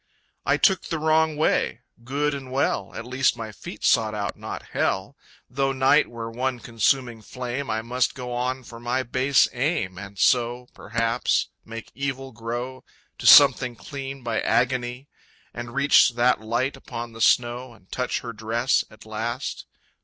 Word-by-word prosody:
I - - +4
took 190 -2 +3
the 165 - -2
wrong 155 0 +2
way. 150 -5 +1 0.2
Good 145 +4 -1
and 135 -2 -7
well, 135 +2 0
At 115 - -6
least 130 0 +1
my 110 -2 -6
feet 105 - -10
sought 110 -1 +3
out 100 -2 -3
not - - -7
Hell! 95 +8 -1 0.3
Though 135 +1 0
night 135 +3 +4
were 115 -1 -6
one 125 +1 -2
consuming 120 0 0
flame 125 +4 -5
I 110 +1 -1
must 125 +2 0
go 125 -1 -5
on 130 +2 -2
for 115 -1 -11
my 120 +2 -1
base 130 +2 +3
aim, 125 - -1
And 100 0 -10
so, 120 +3 +2
perhaps, 115 +2 0
make 115 0 -9
evil 135 0 -4
grow 120 +3 -5 0.4
To - - -1
something 130 -3 +8
clean 135 +1 -7
by 115 -2 -1
agony... 125 +1 0 0.5
And 120 +1 -7
reach 140 -2 +5
that 120 0 +2
light 120 +5 -1
upon 120 -3 -7
the 115 - -9
snow... 120 +1 +2
And 95 - -23
touch 125 -1 -2
her 120 -1 -6
dress 115 +4 +1
at 110 - -16
last... 110 +2 -4
125 Hz, 160 wpm, -24 LUFS, 115-135 Hz, 0.5 s, something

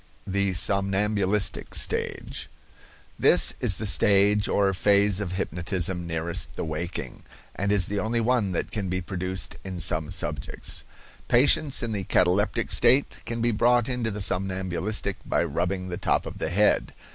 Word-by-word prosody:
THE 100 0 0
SOMNAMBULISTIC 100 +1 0
STAGE. - - -1 0.7
This - - +4
is 95 - +1
the 110 - -4
stage 105 0 +3
or 100 -1 +1
phase 100 +1 +3
of 95 -3 -4
hypnotism 90 0 -2
nearest 80 0 -2
the - - -4
waking, 80 +3 -5 0.3
and 100 +1 -1
is 100 -3 +3
the 105 +2 -2
only 115 +3 -1
one 115 -4 +1
that 85 - -3
can 100 -4 -3
be 95 +1 -1
produced 95 0 -4
in 95 -2 -6
some 80 -2 0
subjects. 75 -7 -3 0.4
Patients 135 +2 +4
in 115 - -3
the 100 -3 -3
cataleptic 100 +6 +1
state 125 +4 +4
can 115 0 -3
be 120 +1 +2
brought 120 +2 +2
into 125 -3 -2
the 105 -1 -5
somnambulistic 95 +2 -2
by - - 0
rubbing 90 +4 -2
the 90 - -4
top - - 0
of - - -8
the - - -2
head. 105 +4 +1
95 Hz, 155 wpm, -25 LUFS, 90-105 Hz, 0.7 s, This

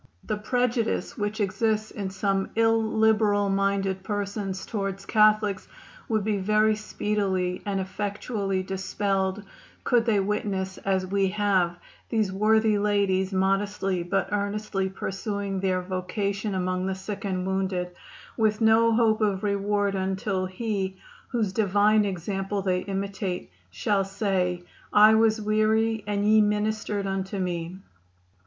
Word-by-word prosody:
The 215 - -2
prejudice 245 +1 -1
which 210 +1 -3
exists 215 +1 0
in 200 -3 -4
some 195 0 -1
illiberal 220 -2 +3
minded 195 -1 0
persons 200 -2 -3
toward 195 -2 -4
Catholics 215 -2 +3 0.4
would 215 -2 +1
be 210 -1 0
very 215 +2 +3
speedily 195 -4 -1
and 195 -1 0
effectually 195 0 -2
dispelled 195 +1 -1 0.4
could 240 -1 +2
they 210 -3 +3
witness, 195 -1 -2
as 190 -1 0
we 195 +1 +1
have, 190 -3 +1 0.3
these 215 -4 +1
worthy 215 +1 +3
ladies 200 -2 +1
modestly 195 -1 0
but 190 +3 -1
earnestly 200 -1 -1
pursuing 195 +1 -3
their 185 -1 0
vocation 195 +2 -2
among 185 0 -1
the 190 - -1
sick 200 +3 -6
and 185 -2 -2
wounded, 190 -2 -1 0.4
with 215 -2 +1
no 225 0 +4
hope 220 -1 +3
of 200 -2 +1
reward 205 0 0
until 190 0 -1
He, 190 -1 -3 0.3
whose 220 -6 -1
divine 210 +1 +3
example 195 +1 -3
they 185 -1 +1
imitate, 195 - -4 0.2
shall 195 - 0
say: 190 -3 -1 0.3
'I 215 +1 +7
was 220 0 +3
weary 215 +1 +1
and 205 0 0
ye 215 +1 +6
ministered 210 -1 0
unto 195 0 -3
me. 175 -1 -3
200 Hz, 125 wpm, -26 LUFS, 190-215 Hz, 0.4 s, I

